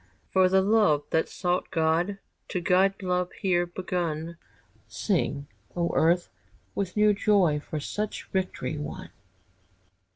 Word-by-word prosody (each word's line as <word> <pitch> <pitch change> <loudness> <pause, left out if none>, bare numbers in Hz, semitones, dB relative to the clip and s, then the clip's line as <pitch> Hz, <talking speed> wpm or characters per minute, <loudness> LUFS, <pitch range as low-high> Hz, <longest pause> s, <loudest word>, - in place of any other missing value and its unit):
For 185 -1 +5
the 190 0 +4
love 200 -8 +3
that 160 - +1
sought 180 -1 -1
God 170 +3 +1 0.3
To 180 - -2
guide 190 +3 +2
love 180 0 0
here 175 -2 +1
begun! 170 -2 -3 0.5
Sing, 145 -8 -1 0.3
O 170 -1 0
earth, 175 +2 +3 0.5
with 195 0 -3
new 210 0 +5
joy 195 -7 +3
For 150 +1 -5
such 210 +8 -4
victory 185 -5 -2
won! 150 - -7
180 Hz, 125 wpm, -27 LUFS, 165-195 Hz, 0.5 s, For